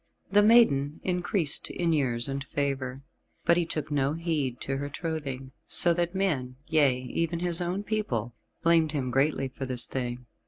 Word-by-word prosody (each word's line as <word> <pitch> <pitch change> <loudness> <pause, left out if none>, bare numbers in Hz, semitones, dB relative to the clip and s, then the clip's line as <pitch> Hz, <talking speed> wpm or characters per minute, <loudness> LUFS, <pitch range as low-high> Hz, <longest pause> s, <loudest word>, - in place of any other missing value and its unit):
The 205 +1 +6
maiden 180 -11 +4
increased 180 -3 0
in 170 -2 0
years 125 -5 0
and 135 0 -3
favour, 135 -2 -3 0.4
but 170 - +5
he 170 -1 0
took 155 -2 -4
no 140 0 +1
heed 155 -7 -2
to 135 0 -2
her 145 +1 -4
trothing, 140 -4 -5 0.2
so 175 - +6
that 175 +2 -1
men 140 -10 -1
yea, 145 -6 +3
even 165 +6 -2
his 175 -1 +3
own 180 +3 -2
people 130 - -2 0.3
blamed 165 -2 +3
him 130 -4 -2
greatly 135 +1 +1
for 130 0 -7
this 125 -2 +1
thing. 125 -1 -4
145 Hz, 165 wpm, -27 LUFS, 130-170 Hz, 0.4 s, The